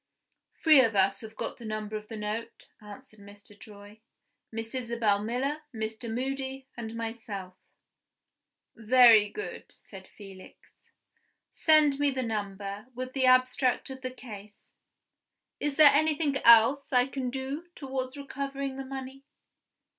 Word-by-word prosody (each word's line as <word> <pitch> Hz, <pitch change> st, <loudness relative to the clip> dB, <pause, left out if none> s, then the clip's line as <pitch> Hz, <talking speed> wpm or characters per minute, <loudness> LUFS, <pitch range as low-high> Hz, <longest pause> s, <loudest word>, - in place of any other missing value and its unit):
"Three 310 Hz, -4 st, +8 dB
of 225 Hz, -4 st, +1 dB
us 195 Hz, 0 st, +2 dB
have 220 Hz, -1 st, -10 dB
got -, -, -5 dB
the 240 Hz, -, -12 dB
number 215 Hz, 0 st, -5 dB
of 210 Hz, 0 st, -6 dB
the 225 Hz, -, -8 dB
note," 210 Hz, +2 st, -6 dB
answered 215 Hz, +1 st, -13 dB
Mr. 205 Hz, +1 st, -15 dB
Troy; 205 Hz, +1 st, -14 dB, 0.5 s
"Miss 225 Hz, +1 st, -6 dB
Isabel 235 Hz, -5 st, 0 dB
Miller, 265 Hz, +7 st, -2 dB
Mr. 220 Hz, 0 st, -5 dB
Moody, 265 Hz, +2 st, -4 dB
and 230 Hz, -1 st, -7 dB
myself." 225 Hz, -5 st, -6 dB, 1.2 s
"Very 230 Hz, -2 st, +6 dB
good," 420 Hz, -, -8 dB
said 190 Hz, -2 st, -14 dB
Felix. 195 Hz, -2 st, -15 dB, 0.7 s
"Send 305 Hz, -3 st, +3 dB
me 290 Hz, 0 st, +3 dB
the 260 Hz, -1 st, -2 dB
number, 205 Hz, -1 st, -5 dB
with 255 Hz, +1 st, -6 dB
the 260 Hz, -2 st, +1 dB
abstract 255 Hz, +1 st, +2 dB
of 265 Hz, 0 st, -9 dB
the 255 Hz, -, -4 dB
case. 210 Hz, -5 st, -12 dB, 0.9 s
Is 290 Hz, -1 st, -2 dB
there 300 Hz, -2 st, +8 dB
anything 305 Hz, -1 st, +2 dB
else 235 Hz, +4 st, +5 dB
I 250 Hz, -1 st, +4 dB
can 265 Hz, -1 st, -4 dB
do 270 Hz, +6 st, -5 dB
towards 265 Hz, -1 st, -5 dB
recovering 275 Hz, -1 st, -5 dB
the 270 Hz, -, -6 dB
money?" 265 Hz, 0 st, -8 dB
245 Hz, 135 wpm, -28 LUFS, 215-270 Hz, 1.2 s, Three